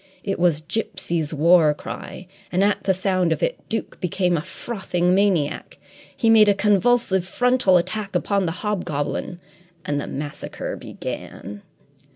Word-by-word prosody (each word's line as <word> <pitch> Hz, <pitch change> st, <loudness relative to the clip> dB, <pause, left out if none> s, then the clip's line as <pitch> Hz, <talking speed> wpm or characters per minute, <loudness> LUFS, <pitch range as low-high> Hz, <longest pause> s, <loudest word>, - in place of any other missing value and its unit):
It 195 Hz, -2 st, -2 dB
was 170 Hz, -3 st, +2 dB
Gipsy's 170 Hz, -5 st, -2 dB
war 160 Hz, 0 st, +4 dB
cry, 180 Hz, -, -8 dB, 0.3 s
and, 185 Hz, +2 st, +2 dB
at 205 Hz, +1 st, +1 dB
the 190 Hz, -, +3 dB
sound 185 Hz, -2 st, +1 dB
of -, -, -1 dB
it, -, -, 0 dB
Duke 225 Hz, -, -4 dB
became 180 Hz, -1 st, +1 dB
a 155 Hz, -, 0 dB
frothing 180 Hz, -2 st, -2 dB
maniac. 185 Hz, -7 st, +1 dB, 0.4 s
He 230 Hz, -, +1 dB
made 220 Hz, -2 st, +7 dB
a 200 Hz, -, +4 dB
convulsive 210 Hz, -1 st, +2 dB
frontal 245 Hz, 0 st, +3 dB
attack 195 Hz, +2 st, -3 dB
upon 195 Hz, +1 st, +1 dB
the -, -, 0 dB
hobgoblin 175 Hz, -3 st, -2 dB, 0.5 s
and 145 Hz, -2 st, -1 dB
the -, -, -6 dB
massacre 145 Hz, +1 st, -5 dB
began. 100 Hz, +2 st, -7 dB
185 Hz, 145 wpm, -22 LUFS, 165-205 Hz, 0.5 s, made